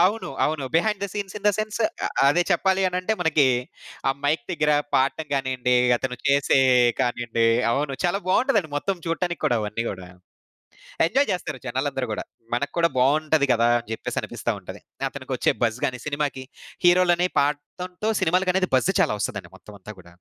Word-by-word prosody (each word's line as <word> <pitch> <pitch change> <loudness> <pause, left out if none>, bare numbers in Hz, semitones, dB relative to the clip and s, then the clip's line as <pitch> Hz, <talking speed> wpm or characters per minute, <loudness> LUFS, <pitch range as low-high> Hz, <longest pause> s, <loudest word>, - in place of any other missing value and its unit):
అవును. 205 +6 +2
అవును. 150 -3 -1
Behind 200 +4 +1
the 200 - 0
scenes 205 -2 -5
in 205 - -22
the - - +7
sense 215 0 -2 0.3
ఆహ్, - - -3 0.2
అదే 175 +5 +3
చెప్పాలి 190 +2 +2
అని 180 - -4
అంటే 185 +4 -1
మనకి, 155 -4 +3 0.6
ఆ - - +5
మైక్ 155 +8 +1
దగ్గర 150 -3 +1 0.2
పాడటం 135 +4 +1
గానియండి, 130 -2 0 0.2
అతను 125 0 -4
చేసే 140 0 +3 0.4
కానియండి 120 -1 0 0.2
అవును. 140 +2 -1
చాలా 175 +2 +2
బాగుంటదండి. 190 - +2
మొత్తం 195 +6 -1
చూడటానికి 175 +1 -2
కూడా 120 - +2
అవన్నీ 105 +2 -3
గూడా. 95 -2 -7 1.0
ఎంజాయ్ 275 +11 +1
జేస్తారు 155 -6 -3
జనాలందరూ 130 0 -2
గూడా, 105 - -4 0.3
మనకు 140 +4 -2
కూడా 170 0 +4
బాగుంటది 150 +2 +3
గదా! 115 0 +3
అని 120 - -11
జెప్పేసి - - -4
అనిపిస్తా - - -4
ఉంటది. - - -10 0.3
అతనికొచ్చే - - -1
బజ్‌ 115 0 +1
గాని 125 -1 -4
సినిమాకి 145 -2 -2 0.4
హీరోలని 175 0 +4
పాడటంతో 180 +8 -2
సినిమాలకి 185 +2 +1
బజ్‌ 130 - +2
చాలా 160 - +2
ఒస్తదండి - - -4
మొత్తం 105 - -14
అంతా 105 +3 -9
గూడా. 90 - -15
150 Hz, 165 wpm, -24 LUFS, 130-180 Hz, 1.0 s, the